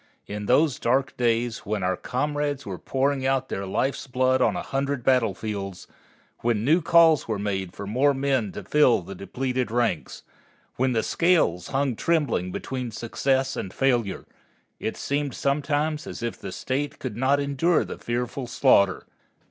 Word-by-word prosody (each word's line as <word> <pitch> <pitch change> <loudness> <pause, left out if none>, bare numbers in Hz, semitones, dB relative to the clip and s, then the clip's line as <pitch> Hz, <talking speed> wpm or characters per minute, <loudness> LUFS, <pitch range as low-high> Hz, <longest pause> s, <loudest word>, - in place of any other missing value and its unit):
In 105 0 -5
those 140 +2 +3
dark 130 +3 +1
days, 120 -1 0
when 105 -2 -3
our 90 0 +1
comrades 145 +4 -2
were 95 -4 -6
pouring 135 0 0
out 135 0 0
their 95 0 -3
life's 135 +9 -1
blood 130 0 +2
on - - +3
a - - -3
hundred 135 -1 -2
battlefields, 105 -6 0 0.5
when 115 -2 0
new 160 +6 +4
calls 165 -2 +5
were 110 -2 -1
made 95 -3 -3
for 100 - -6
more 135 +7 +2
men 135 -6 0
to - - -7
fill 130 -10 +3
the 100 - -8
depleted 125 +5 -3
ranks, 115 -7 -1 0.5
when 130 0 +1
the 115 - +1
scales 165 - +2
hung 135 -2 0
trembling 145 - 0
between 130 +3 -4
success 130 +4 -1
and 95 - -5
failure, 120 -8 0 0.5
it 110 - -3
seemed 140 -1 -2
sometimes 150 +2 0
as - - -7
if 115 - -2
the - - -8
State 140 +3 -3
could 130 -5 -5
not 130 +4 +2
endure 145 +4 +1
the - - -7
fearful 120 +2 -3
slaughter. 100 -6 +3
130 Hz, 160 wpm, -25 LUFS, 110-140 Hz, 0.5 s, calls